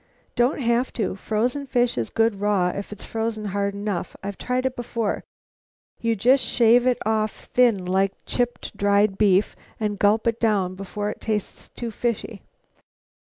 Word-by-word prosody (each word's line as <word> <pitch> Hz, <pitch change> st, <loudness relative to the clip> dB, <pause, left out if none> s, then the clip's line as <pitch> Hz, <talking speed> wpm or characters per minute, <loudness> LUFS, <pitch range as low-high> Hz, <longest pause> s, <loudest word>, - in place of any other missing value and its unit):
"Don't 245 Hz, +4 st, +2 dB
have 235 Hz, +1 st, +1 dB
to. 210 Hz, -5 st, -2 dB
Frozen 245 Hz, +8 st, -1 dB
fish 245 Hz, -1 st, +2 dB
is 115 Hz, -2 st, -2 dB
good 225 Hz, -3 st, +1 dB
raw 200 Hz, -4 st, +2 dB
if 200 Hz, +3 st, -5 dB
it's 210 Hz, -, -8 dB
frozen 225 Hz, -1 st, -3 dB
hard 200 Hz, 0 st, -1 dB
enough. 200 Hz, -3 st, -3 dB
I've 200 Hz, 0 st, -4 dB
tried 250 Hz, +1 st, -1 dB
it 260 Hz, -1 st, 0 dB
before. 230 Hz, -3 st, -2 dB, 0.8 s
You 230 Hz, -1 st, +1 dB
just 255 Hz, +6 st, +4 dB
shave 240 Hz, +1 st, +4 dB
it 250 Hz, -, +3 dB
off 215 Hz, -1 st, 0 dB
thin 230 Hz, -7 st, +4 dB
like 190 Hz, +2 st, +1 dB
chipped 245 Hz, -1 st, -2 dB
dried 200 Hz, 0 st, +2 dB
beef 200 Hz, -1 st, +3 dB, 0.2 s
and 210 Hz, -2 st, -2 dB
gulp 210 Hz, +2 st, +3 dB
it 230 Hz, -1 st, +1 dB
right -, -, -32 dB
down 200 Hz, -5 st, +1 dB
before 205 Hz, +2 st, -4 dB
it -, -, -11 dB
tastes 215 Hz, -3 st, -3 dB
too 235 Hz, -1 st, -5 dB
fishy." 225 Hz, -2 st, -3 dB
215 Hz, 165 wpm, -24 LUFS, 200-235 Hz, 0.8 s, just